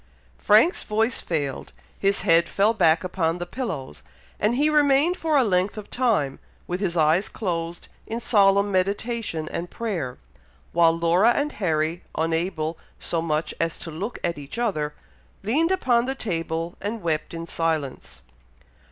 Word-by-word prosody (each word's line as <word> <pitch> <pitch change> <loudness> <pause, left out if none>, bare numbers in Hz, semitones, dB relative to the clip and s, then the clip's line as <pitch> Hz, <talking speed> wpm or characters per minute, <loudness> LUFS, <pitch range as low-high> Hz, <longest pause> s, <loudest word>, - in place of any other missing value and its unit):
'" - - -32
Frank's 225 - +4
voice 225 +3 0
failed, 145 -5 -3 0.3
his 200 0 +2
head 170 -3 +4
fell 205 +3 +3
back 165 -6 +3
upon 175 -2 -1
the 175 - -4
pillows, 165 - -5 0.4
and 215 +3 +2
he 290 +4 +3
remained 295 +2 +4
for 320 -4 +1
a 270 - +5
length 190 0 +1
of 210 - -8
time, 210 - +1 0.3
with 180 +1 -3
his 180 -4 -1
eyes 160 +4 +3
closed 170 -4 -4 0.2
in 225 +1 -3
solemn 200 -3 +4
meditation 200 -2 -1
and 175 +1 -4
prayer, 175 - -3 0.6
while 170 -1 +5
Laura 170 +6 +3
and 290 +3 -1
Harry, 165 - -1 0.2
unable 165 0 -1 0.2
so 165 - -2
much 155 -1 -1
as 165 -1 -1
to 165 - -8
look 195 +10 -5
at 170 -3 -1
each 145 +8 -9
other, 155 -11 -1 0.5
leaned 305 - +2
upon 250 -10 +2
the 265 - -1
table, 165 -6 -3
and 210 0 -4
wept 155 -2 -1
in 165 0 -5
silence. 155 - -3
180 Hz, 155 wpm, -24 LUFS, 165-225 Hz, 0.6 s, a